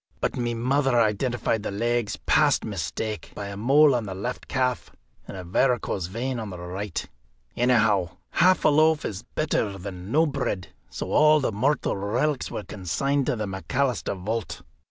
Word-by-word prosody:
But - - -1
my 120 -1 -1
mother 130 +1 +2
identified 115 +1 +1
the - - -3
legs 120 +2 -1
past - - +3
mistake, 110 -2 -4
by 100 -1 -5
a 100 - -6
mole 140 +7 +5
on 120 -4 -1
the 95 - -5
left 120 +7 -5
calf 125 -3 -1 0.4
and - - -7
a 95 - -6
varicose 100 -1 0
vein 120 +6 -3
on 110 -2 -5
the 90 - -7
right. 90 +2 -5 0.5
Anyhow, 110 -8 +2
half 185 +1 +4
a - - +7
loaf 155 +1 +3
is 100 -1 -4
better 110 -10 0
than 95 +1 -7
no 160 +4 +4
bread, 135 - -2 0.2
so - - -5
all 155 0 +6
the 135 - 0
mortal 130 +8 0
relics 120 +9 -1
were 105 - -5
consigned 105 - -1
to - - +1
the 110 -2 -3
McAlister 100 +2 -1
vault. 115 +1 -3
115 Hz, 170 wpm, -25 LUFS, 100-135 Hz, 0.5 s, a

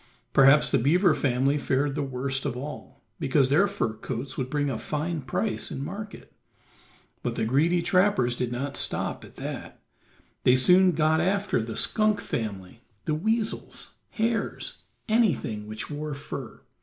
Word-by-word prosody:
Perhaps 135 +2 +6
the - - +3
beaver 170 - +4
family 135 +2 +1
fared 140 +1 0
the 150 - -2
worst 135 0 -2
of 130 -4 -3
all, 145 +4 -8 0.2
because 135 -3 +2
their 185 +8 +5
fur 110 - -2
coats 120 +4 -6
would 130 -1 -3
bring 145 0 0
a 125 -5 -2
fine 155 +1 -3
price 140 - -2
in 135 -1 -5
market. 200 +5 -8 0.9
But - - -3
the - - 0
greedy 165 +8 +2
trappers 180 -10 +2
did 120 -1 -2
not 135 +3 -3
stop - - -1
at - - -14
that; - - -7 0.6
they 125 - +6
soon 180 +7 +5
got 160 +1 +2
after 190 - +1
the 110 0 -5
skunk 215 -2 +2
family, 110 - -5 0.2
the 155 - 0
weasels, 220 +7 -2 0.2
hares, 225 +1 -2 0.3
anything 170 - +1
which 110 +6 -6
wore 150 0 -4
fur. 140 - -8
145 Hz, 155 wpm, -26 LUFS, 130-180 Hz, 0.9 s, Perhaps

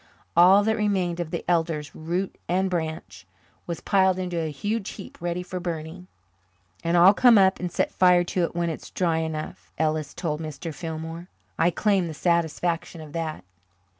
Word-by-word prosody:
All 185 +4 +7
that 220 +1 +1
remained 190 -5 0
of 170 -2 -3
the 170 - -4
elders, 165 -3 0
root 175 +4 -3
and 185 +2 +1
branch, 155 - -4 0.4
was 170 -1 -4
piled 190 -2 +3
into 180 -2 -2
a 160 - -2
huge 205 +8 -3
heap 195 - -10
ready 175 +1 -2
for 185 0 -5
burning. 170 +1 -5 0.8
"And 170 +1 +2
I'll 180 +3 +8
come 240 +1 +6
up 190 -1 +4
and 180 -1 -3
set - - 0
fire 180 -1 +5
to 175 +1 -1
it 170 - -8
when 170 -1 0
it's 160 - -8
dry 165 -3 0
enough," 160 -1 -5
Ellis 155 -2 -1
told 155 -3 -3
Mr. 155 +1 -6
Fillmore. 165 +2 -6 0.3
"I 170 - +4
claim 195 -1 +1
the 160 - -6
satisfaction 170 0 0
of 155 -2 -10
that." 160 -2 -4
170 Hz, 175 wpm, -25 LUFS, 160-185 Hz, 0.8 s, I'll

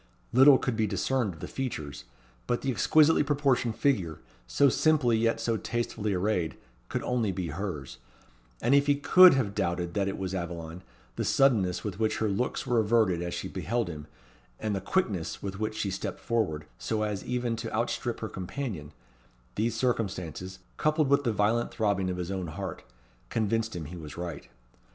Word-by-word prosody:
Little 135 +2 +8
could 125 -3 -2
be 110 -1 +1
discerned 105 +1 0
of 80 - -15
the - - -5
features; 75 - -5 0.4
but 120 - 0
the 135 - +1
exquisitely 155 - +4
proportioned 140 -5 +1
figure, 95 - +1 0.3
so 140 - +4
simply 140 -3 +3
yet 115 0 +1
so 115 0 0
tastefully 115 -2 -2
arrayed, 90 -4 0 0.3
could - - -2
only 120 -5 0
be 90 -2 -3
hers; 85 -9 -5 0.6
and 125 - +3
if 140 0 +4
he 145 - +4
could 180 +4 +7
have 115 -7 0
doubted 85 -2 -1
that 100 -1 0
it 100 - -3
was 95 -1 -3
Aveline, 85 -1 -5 0.4
the - - 0
suddenness 110 -10 +3
with 100 -2 -5
which 110 -1 +1
her 110 - 0
looks 100 +6 -1
were 120 -2 +2
averted 110 -5 +2
as 85 0 -3
she - - -4
beheld 120 -5 -2
him, 75 -2 -7 0.5
and 110 -2 -1
the 95 - -2
quickness 100 - -1
with 100 0 -5
which 110 0 -2
she 100 - -1
stepped 95 - -4
forward, 95 -11 -1
so 110 -1 -1
as 105 -2 -2
even 125 -2 -1
to 115 0 -5
outstrip 120 +1 -2
her 110 - -2
companion 95 - -5 0.6
these 115 +2 0
circumstances, 95 - -2 0.2
coupled 155 -2 +2
with 140 0 +3
the 120 - +2
violent 110 +3 +1
throbbing 100 -4 0
of 90 - -3
his 90 +1 -4
own 95 -2 -3
heart, 95 +4 -6 0.5
convinced 115 0 0
him 85 -3 -5
he 85 +5 -8
was 80 -3 -9
right. 85 0 -6
110 Hz, 180 wpm, -28 LUFS, 90-120 Hz, 0.6 s, Little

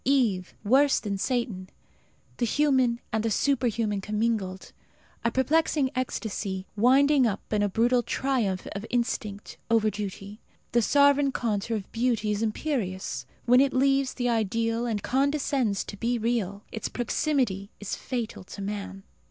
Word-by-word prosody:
Eve 230 -10 +1
worse 270 +6 +4
than 205 -2 -3
Satan; 200 -4 -2 0.7
the 240 - +1
human 260 -3 +2
and 220 -1 +1
the 225 - +1
superhuman 230 -4 +1
commingled. 210 -3 -2 0.5
A 235 - +3
perplexing 280 +1 +2
ecstasy, 205 -6 -3
winding 265 +4 +5
up 205 0 -4
in 210 - +2
a 205 - +2
brutal 240 +5 +3
triumph 235 -8 -1
of 200 0 -5
instinct 215 -4 -2
over 220 -2 +3
duty. 205 0 -6 0.3
The 240 - +3
sovereign 285 +4 +4
contour 225 -2 -1
of 200 - -9
beauty 230 -3 0
is 210 +1 -1
imperious. 195 - -2 0.2
When 250 +2 +6
it 275 -1 +2
leaves 270 0 +2
the 245 -1 -1
ideal 230 +1 0
and 215 -3 -2
condescends 270 -5 +1
to - - -8
be 240 +3 0
real, 215 -4 -1
its 220 - -4
proximity 240 -6 -1
is 205 - -4
fatal 235 -6 -4
to 200 - -9
man. 195 -1 -5
230 Hz, 145 wpm, -27 LUFS, 205-260 Hz, 0.7 s, When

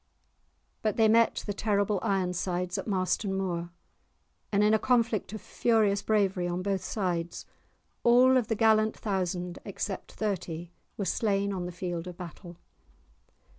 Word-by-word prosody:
But 215 -1 0
they 225 -1 +5
met 230 +1 +3
the 205 - -2
terrible 205 -1 +1
Ironsides 180 -3 -1
at - - -6
Marston 190 0 0
Moor, 175 -3 -2 0.8
and 205 0 +3
in 210 +1 +4
a 220 - +4
conflict 230 -6 +1
of 215 -2 -6
furious 215 -4 +2
bravery 195 -4 +1
on 175 +1 -2
both 195 -1 -1
sides, 175 -5 -2 0.6
all 250 +2 +6
of 245 -4 +2
the 225 - 0
gallant 220 0 +3
thousand 180 -3 -2
except 200 0 -5
thirty 175 -5 -3 0.3
were 200 - -2
slain 200 +1 0
on 180 -2 -3
the - - -5
field 175 -1 -4
of 180 -1 -8
battle. 175 0 -9
195 Hz, 145 wpm, -29 LUFS, 180-215 Hz, 0.8 s, all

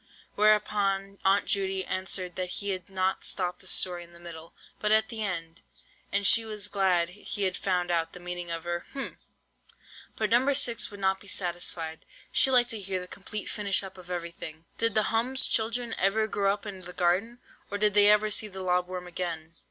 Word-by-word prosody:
Whereupon 205 -2 +1
Aunt 195 +1 +3
Judy 190 -1 0
answered 185 -1 -1
that 185 -1 -3
he 200 - -3
had 185 0 -4
not 190 0 -1
stopped 180 -2 -1
the - - -11
story 175 -2 +4
in 170 0 -17
the 170 - -15
middle, 165 -1 -11 0.2
but 210 - +1
at 220 0 +4
the 225 -2 -5
end, 165 -4 -4 0.5
and 200 0 +2
she 230 +3 +7
was 210 -2 -3
glad 185 -4 +1
he 205 +2 -5
had 185 - 0
found 180 -2 -1
out 165 -1 -1
the 180 - -10
meaning 175 0 -6
of 165 -1 -3
her—hm—! 175 +10 -5 1.0
But 215 -1 -2
No. 255 +4 +3
6 245 -4 +3
would 205 -2 -11
not 190 0 0
be 200 - -16
satisfied, 175 -3 -3 0.3
she 270 - +5
liked 245 -2 +5
to 225 - -3
hear 190 -1 -3
the 180 - -7
complete 200 +2 -3
finish 200 -2 +2
up 190 -1 -9
of 180 -1 -15
everything. 170 -2 -6
"Did 230 -2 +3
the 215 - +4
'hum's' 250 +4 +3
children 230 +1 +1
ever 205 +3 +2
grow 200 -2 0
up 205 +2 -5
in 195 -3 -7
the 180 0 -10
garden, 185 +8 0 0.3
and 205 - -4
did 210 -1 +4
they 205 0 +7
ever 210 0 +4
see 215 +1 +2
the 190 -2 -8
lob 180 -1 0
worm 180 -1 -7
again?" 170 -2 -5
195 Hz, 200 wpm, -27 LUFS, 180-210 Hz, 1.0 s, she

